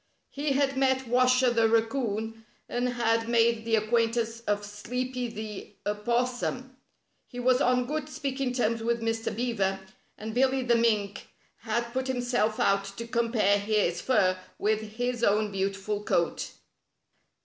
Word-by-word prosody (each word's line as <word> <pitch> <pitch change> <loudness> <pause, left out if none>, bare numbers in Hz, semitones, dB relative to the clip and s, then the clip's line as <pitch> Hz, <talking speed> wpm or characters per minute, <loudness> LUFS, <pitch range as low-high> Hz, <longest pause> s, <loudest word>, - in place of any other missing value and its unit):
He 285 0 -1
had 275 0 +1
met 265 -1 +2
Washer 255 +1 +4
the 230 -1 +3
Raccoon, 225 -1 -1 0.2
and 245 +1 -1
had 230 -1 0
made 230 -1 +3
the 225 -1 +3
acquaintance 230 +1 +1
of 205 0 0
Sleepy 250 +5 -4
the 215 -2 -7
Opos 240 +4 0
sum. 260 +1 -4 0.5
He 245 - -8
was 255 +1 +3
on 250 -1 +3
good 305 +3 -3
speaking 270 -3 -2
terms 230 -2 0
with 235 +1 0
Mr. 225 -1 -1
Beaver, 205 -5 0 0.4
and 220 +1 -6
Billy 260 +2 +2
the 240 -1 +2
Mink 215 -3 +1 0.3
had 235 +2 -2
put 260 +1 -1
himself 245 -4 0
out 195 0 +2
to 230 - -5
compare 230 -4 +2
his 200 -4 0
fur 185 -8 +2 0.2
with 215 +1 +1
his 245 +1 -2
own 210 0 +2
beautiful 195 +1 -2
coat. 170 -4 0
230 Hz, 145 wpm, -28 LUFS, 215-250 Hz, 0.5 s, Washer